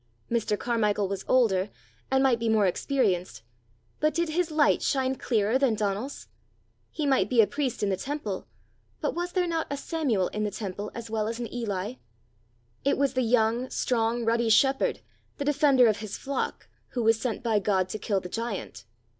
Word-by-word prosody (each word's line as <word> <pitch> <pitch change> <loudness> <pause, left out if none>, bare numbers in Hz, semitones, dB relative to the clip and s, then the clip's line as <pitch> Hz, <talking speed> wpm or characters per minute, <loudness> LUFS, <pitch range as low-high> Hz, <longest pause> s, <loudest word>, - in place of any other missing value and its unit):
Mr. 225 -3 +1
Carmichael 210 -4 0
was 195 0 -4
older, 205 -6 +3 0.4
and 265 0 +3
might 250 -4 +3
be 230 0 0
more 215 -2 +4
experienced; 185 - 0 0.6
but 305 0 +1
did 340 0 +1
his 340 +1 0
light 305 -1 +3
shine 265 -1 +1
clearer 230 -1 +1
than 265 -5 +3
Donal's? 210 +5 -3 0.6
He 305 - -3
might 265 -8 +2
be 245 - +2
a 220 - +8
priest 275 -3 -2
in 205 - +2
the 190 - 0
temple; 220 -5 -4 0.5
but - - -1
was 350 +1 -3
there 365 -1 +2
not 330 -2 -1
a 285 - -3
Samuel 275 - 0
in 215 - -3
the 210 - 0
temple 205 0 -5
as 230 -1 -7
well 215 -1 0
as 230 +1 -4
an 235 - -5
Eli? 215 -1 -3 0.9
It 280 - +2 0.2
the 255 - +1
young, 235 +1 +2
strong, 235 -1 0
ruddy 230 0 +2
shepherd, 270 +5 +3 0.4
the 285 - -3
defender 285 -3 +4
of 215 -3 +3
his 215 -2 -6
flock, 280 0 -3 0.3
who 245 - -1
was 225 0 +4
sent 250 0 -2
by 225 -3 +2
God 190 -2 +1
to 215 - -4
kill 200 -2 0
the 180 - -6
giant! 195 - -5
230 Hz, 185 wpm, -27 LUFS, 210-270 Hz, 0.9 s, a